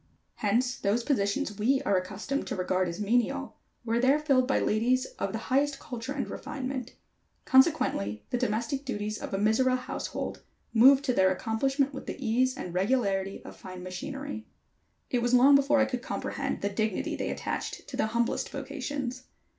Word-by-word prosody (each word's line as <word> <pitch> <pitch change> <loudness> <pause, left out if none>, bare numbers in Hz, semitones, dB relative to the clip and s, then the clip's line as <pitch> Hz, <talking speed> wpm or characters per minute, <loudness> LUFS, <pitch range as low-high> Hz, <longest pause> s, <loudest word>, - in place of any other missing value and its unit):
Hence 245 +5 +1
those 210 +4 0
positions 205 -5 0
we 260 +6 +3
are 200 - +2
accustomed 195 +9 -2
to - - -2
regard 185 0 0
as 170 - -6
menial, 230 +4 0 0.3
were 230 0 +1
there 265 +4 +4
filled 275 -4 +2
by 270 - +2
ladies 250 +4 +2
of 195 - -1
the 220 - -2 0.2
highest 280 +1 +2
culture 245 0 -6
and 280 -1 -2
refinement; 265 -3 -5 0.5
consequently 105 - +3
the - - +1
domestic 250 +4 -1
duties 215 -5 -3
of - - -6
a 195 - -1
Mizora 225 +5 +3
household 255 +1 -5 0.3
moved 265 +4 +7
to 255 - +2
their 190 -4 +4
accomplishment 270 +8 0
with 270 - -8
the - - -4
ease 255 +1 +1
and 180 -10 -6
regularity 195 -1 0
of - - -9
fine 185 -1 -9
machinery. 270 +7 -6 0.6
It 245 - +1
was 245 +1 +3
long 265 +3 +7
before 280 +1 +5
I 270 - +5
could 250 -2 -3
comprehend - - -3
the 200 - 0
dignity 215 0 -1
they - - -3
attached - - -4
to - - -6
the 220 - +1
humblest 235 +1 0
vocations. 270 -2 -4
245 Hz, 170 wpm, -29 LUFS, 210-270 Hz, 0.6 s, moved